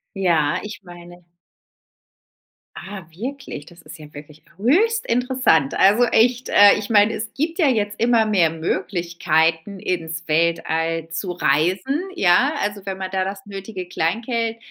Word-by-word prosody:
Ja, 170 Hz, -3 st, +1 dB
ich 210 Hz, 0 st, -8 dB
meine 175 Hz, 0 st, -13 dB, 1.5 s
Ah 190 Hz, +2 st, -9 dB
wirklich, 245 Hz, -, -7 dB
das 170 Hz, -1 st, -16 dB
ist 155 Hz, +1 st, -12 dB
ja 150 Hz, -1 st, -13 dB
wirklich 150 Hz, +1 st, -12 dB, 0.2 s
höchst 440 Hz, -, +2 dB
interessant. 250 Hz, -, +1 dB
Also 210 Hz, +5 st, +5 dB
echt, 240 Hz, +2 st, +2 dB
äh, 205 Hz, 0 st, +7 dB
ich 205 Hz, -, -7 dB
mein, 210 Hz, -1 st, +4 dB
es 220 Hz, -1 st, -5 dB
gibt 325 Hz, +5 st, -2 dB
ja 310 Hz, -, +4 dB
jetzt 210 Hz, -5 st, -1 dB
immer 230 Hz, -1 st, +3 dB
mehr 190 Hz, -6 st, +2 dB
Möglichkeiten, 170 Hz, +1 st, -1 dB
ins 165 Hz, -2 st, -4 dB
Weltall 165 Hz, 0 st, 0 dB
zu 180 Hz, +2 st, -4 dB
reisen, 180 Hz, -, 0 dB
ja? 220 Hz, -, +3 dB
Also, 205 Hz, 0 st, -3 dB
wenn 195 Hz, -1 st, -4 dB
man 190 Hz, -1 st, -5 dB
da 190 Hz, -1 st, 0 dB
das 195 Hz, +1 st, -6 dB
nötige 195 Hz, -2 st, -7 dB
Kleingeld 225 Hz, +7 st, -2 dB
190 Hz, 145 wpm, -21 LUFS, 165-225 Hz, 1.5 s, äh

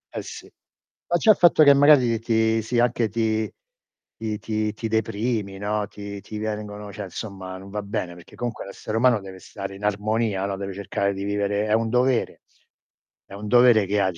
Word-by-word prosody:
Eh -, -, -2 dB
sì. -, -, -9 dB, 0.6 s
Ma 175 Hz, -, +2 dB
già 215 Hz, -, +5 dB
il -, -, +3 dB
fatto 170 Hz, -3 st, +6 dB
che 140 Hz, -1 st, +8 dB
magari 135 Hz, -5 st, +5 dB
ti 110 Hz, -1 st, +1 dB
sì 120 Hz, +2 st, -2 dB
anche 120 Hz, -2 st, +2 dB
ti 110 Hz, 0 st, -1 dB, 0.7 s
ti 110 Hz, -2 st, -3 dB
ti 110 Hz, -1 st, -2 dB
ti 115 Hz, +1 st, -4 dB
deprimi, 110 Hz, -2 st, -1 dB
no, 105 Hz, +1 st, -2 dB
ti 100 Hz, -1 st, -8 dB
ti 105 Hz, -, -8 dB
vengono 105 Hz, -1 st, -5 dB
cioè 105 Hz, +1 st, -6 dB
insomma, 95 Hz, -1 st, -7 dB
non 95 Hz, +1 st, -11 dB
va 105 Hz, 0 st, -3 dB
bene 95 Hz, -3 st, -4 dB
perché 85 Hz, -, -15 dB
comunque 120 Hz, -2 st, -4 dB
l'essere 105 Hz, +2 st, -6 dB
umano 120 Hz, -2 st, +4 dB
deve 95 Hz, -1 st, -10 dB
stare 100 Hz, +1 st, -7 dB
in 100 Hz, -, -12 dB
armonia, 105 Hz, -1 st, 0 dB
no. 100 Hz, -1 st, -2 dB
Deve 95 Hz, -1 st, -5 dB
cercare 100 Hz, 0 st, -2 dB
di 100 Hz, -, -5 dB
vivere 100 Hz, 0 st, 0 dB
è 105 Hz, -, +1 dB
un 115 Hz, 0 st, +2 dB
dovere. 125 Hz, +1 st, +1 dB, 0.8 s
È -, -, -15 dB
un 105 Hz, +2 st, -7 dB
dovere 120 Hz, -2 st, +5 dB
che 105 Hz, 0 st, +1 dB
ha 95 Hz, -, +2 dB
di 85 Hz, -, -13 dB
105 Hz, 200 wpm, -24 LUFS, 100-115 Hz, 0.8 s, che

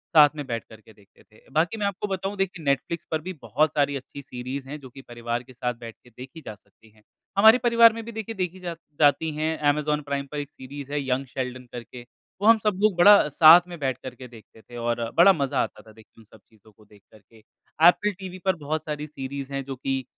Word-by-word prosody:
साथ 150 Hz, -1 st, +8 dB
में 145 Hz, -2 st, -5 dB
बैठ 115 Hz, -1 st, -3 dB
कर 110 Hz, -1 st, -14 dB
के 110 Hz, -, -19 dB
देखते 100 Hz, -1 st, -24 dB
थे। 110 Hz, -, -24 dB
बाकी 165 Hz, +9 st, 0 dB
मैं 210 Hz, -, -2 dB
आपको 200 Hz, +1 st, -3 dB
बताऊँ 195 Hz, +1 st, -3 dB
देखिए 195 Hz, -3 st, -3 dB
नेटफ्लिक्स 140 Hz, +4 st, -1 dB
पर 160 Hz, -1 st, -1 dB
भी 185 Hz, +3 st, -6 dB
बहुत 145 Hz, +7 st, +1 dB
सारी 145 Hz, -1 st, +1 dB
अच्छी 140 Hz, +1 st, -8 dB
सीरीज़ 130 Hz, +1 st, -7 dB
हैं 150 Hz, +2 st, -6 dB
जो 130 Hz, -2 st, -12 dB
कि 135 Hz, +2 st, -13 dB
परिवार 120 Hz, -1 st, -5 dB
के 130 Hz, -, -16 dB
साथ 125 Hz, 0 st, -3 dB
बैठ 115 Hz, -1 st, -9 dB
के 125 Hz, -, -19 dB
देखी 130 Hz, +7 st, -12 dB
जा 110 Hz, -, -6 dB
सकती 110 Hz, +2 st, -26 dB
हैं। 110 Hz, 0 st, -26 dB, 0.4 s
हमारे 220 Hz, +4 st, +8 dB
परिवार 235 Hz, -2 st, +5 dB
में 230 Hz, 0 st, -7 dB
भी 235 Hz, -, -7 dB
देखिए 225 Hz, 0 st, -6 dB
देखी 185 Hz, -1 st, -3 dB
जा 175 Hz, -2 st, -5 dB, 0.2 s
जाती 150 Hz, +2 st, +3 dB
हैं। 155 Hz, +1 st, -1 dB
अमेज़न 150 Hz, 0 st, 0 dB
प्राइम 140 Hz, -1 st, -3 dB
पर 150 Hz, -, -5 dB
एक 145 Hz, 0 st, -6 dB
सीरीज़ 140 Hz, +1 st, -10 dB
है 145 Hz, 0 st, -1 dB
यंग 130 Hz, +1 st, 0 dB
शेल्डन 125 Hz, -1 st, -6 dB
करके, 120 Hz, 0 st, -9 dB, 0.4 s
वो 205 Hz, -, +2 dB
हम 225 Hz, 0 st, +8 dB
सब 210 Hz, -3 st, +1 dB
लोग 215 Hz, -3 st, +4 dB
बड़ा 200 Hz, -1 st, +7 dB
साथ 160 Hz, +4 st, +8 dB
में 175 Hz, -1 st, -8 dB
बैठ 130 Hz, -4 st, -1 dB
कर 125 Hz, -1 st, -7 dB
के 125 Hz, +1 st, -11 dB
देखते 110 Hz, -1 st, -17 dB
थे 120 Hz, +2 st, -12 dB
और 120 Hz, 0 st, -2 dB
बड़ा 190 Hz, +3 st, +8 dB
मज़ा 140 Hz, -5 st, -1 dB
आता 105 Hz, -, -8 dB
था -, -, -14 dB
देख 110 Hz, 0 st, -18 dB
उन 115 Hz, -, -16 dB
सब 110 Hz, +1 st, -19 dB
चीजों 110 Hz, -1 st, -23 dB
को 105 Hz, +1 st, -23 dB
देख 105 Hz, 0 st, -21 dB
कर 110 Hz, -, -18 dB
के। 110 Hz, +3 st, -23 dB, 0.5 s
एप्पल 210 Hz, +4 st, +4 dB
टीवी 185 Hz, -1 st, -8 dB
पर 190 Hz, -2 st, +2 dB
बहुत 155 Hz, 0 st, -4 dB
सारी 150 Hz, -1 st, -5 dB
सीरीज़ 140 Hz, -1 st, -7 dB
है 140 Hz, 0 st, -3 dB
जो 135 Hz, 0 st, -6 dB
कि 135 Hz, +1 st, -3 dB
140 Hz, 245 wpm, -25 LUFS, 125-170 Hz, 0.5 s, साथ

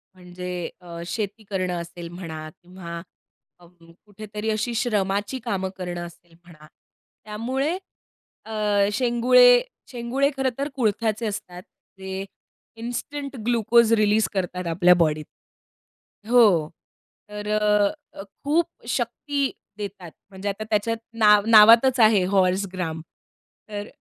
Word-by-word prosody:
म्हणजे 180 Hz, 0 st, -9 dB, 0.3 s
अ, 170 Hz, -1 st, -9 dB
शेती 210 Hz, +3 st, -4 dB
करणं 185 Hz, -2 st, -1 dB
असेल 170 Hz, 0 st, -9 dB
म्हणा 160 Hz, -3 st, -7 dB
किंवा 175 Hz, -1 st, -8 dB, 0.6 s
अ, 175 Hz, -, -18 dB, 0.4 s
कुठेतरी 210 Hz, +1 st, -6 dB
अशी 220 Hz, +2 st, -1 dB
श्रमाची 210 Hz, 0 st, -1 dB
कामं 190 Hz, -5 st, -2 dB
करणं 175 Hz, -2 st, -5 dB
असेल 170 Hz, 0 st, -15 dB
म्हणा. 155 Hz, -3 st, -16 dB, 0.6 s
त्यामुळे 260 Hz, +10 st, -2 dB, 0.7 s
अ, 220 Hz, -, -9 dB, 0.4 s
शेंगुळे 255 Hz, -, +5 dB, 0.3 s
शेंगुळे 250 Hz, +3 st, 0 dB
खरंतर 265 Hz, +1 st, -1 dB
कुळथ्याचे 225 Hz, -2 st, 0 dB
असतात. 180 Hz, -4 st, -6 dB, 0.4 s
जे 190 Hz, 0 st, -5 dB, 0.6 s
इन्स्टंट 275 Hz, +4 st, -5 dB
ग्लुकोज 235 Hz, -1 st, +3 dB
रिलीज 215 Hz, 0 st, +3 dB
करतात 180 Hz, -2 st, -3 dB
आपल्या 175 Hz, +2 st, +5 dB
बॉडीत. 155 Hz, -1 st, +1 dB, 1.0 s
हो. 205 Hz, -11 st, +5 dB, 0.6 s
तर 210 Hz, 0 st, -7 dB
अ, 210 Hz, -1 st, +3 dB, 0.3 s
अ, -, -, -5 dB, 0.2 s
खूप 310 Hz, +4 st, +2 dB, 0.2 s
शक्ती 285 Hz, -2 st, -1 dB, 0.3 s
देतात. 200 Hz, -4 st, -7 dB, 0.2 s
म्हणजे 195 Hz, +1 st, -5 dB
आता 200 Hz, +2 st, -4 dB
त्याच्यात 225 Hz, +2 st, 0 dB, 0.2 s
नाव 210 Hz, -1 st, +6 dB
नावातच 230 Hz, +4 st, +7 dB
आहे 215 Hz, -4 st, +5 dB
हॉर्स 190 Hz, 0 st, +2 dB
ग्राम. 165 Hz, -3 st, -4 dB, 0.7 s
तर 205 Hz, 0 st, -5 dB
210 Hz, 110 wpm, -24 LUFS, 180-235 Hz, 1.0 s, नावातच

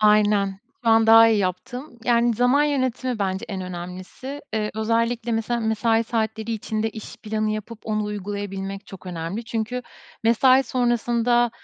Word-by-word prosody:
aynen. 205 Hz, -2 st, +3 dB, 0.2 s
Şu -, -, +2 dB
an 225 Hz, 0 st, +5 dB
daha 225 Hz, 0 st, +8 dB
iyi 220 Hz, -, +3 dB
yaptım. 235 Hz, -, -4 dB
Yani, 235 Hz, -1 st, +3 dB
zaman 250 Hz, +5 st, +3 dB
yönetimi 260 Hz, -4 st, -1 dB
bence 190 Hz, +1 st, -1 dB
en 195 Hz, -3 st, -4 dB
önemlisi. 185 Hz, +10 st, -7 dB
Iıı, 210 Hz, -1 st, 0 dB
özellikle 230 Hz, +2 st, 0 dB
mesela 225 Hz, +1 st, 0 dB
mesai 225 Hz, +1 st, +1 dB
saatleri 220 Hz, 0 st, -2 dB
içinde 220 Hz, 0 st, -2 dB
iş 215 Hz, 0 st, -9 dB
planı 215 Hz, -1 st, -2 dB
yapıp 215 Hz, +1 st, -5 dB
onu 215 Hz, -1 st, -1 dB
uygulayabilmek 200 Hz, -1 st, -5 dB
çok 190 Hz, -1 st, -11 dB
önemli. 175 Hz, +6 st, -4 dB
Çünkü 230 Hz, +3 st, -3 dB, 0.4 s
mesai 255 Hz, +4 st, +5 dB
sonrasında, 240 Hz, -1 st, +2 dB
220 Hz, 145 wpm, -23 LUFS, 205-240 Hz, 0.4 s, daha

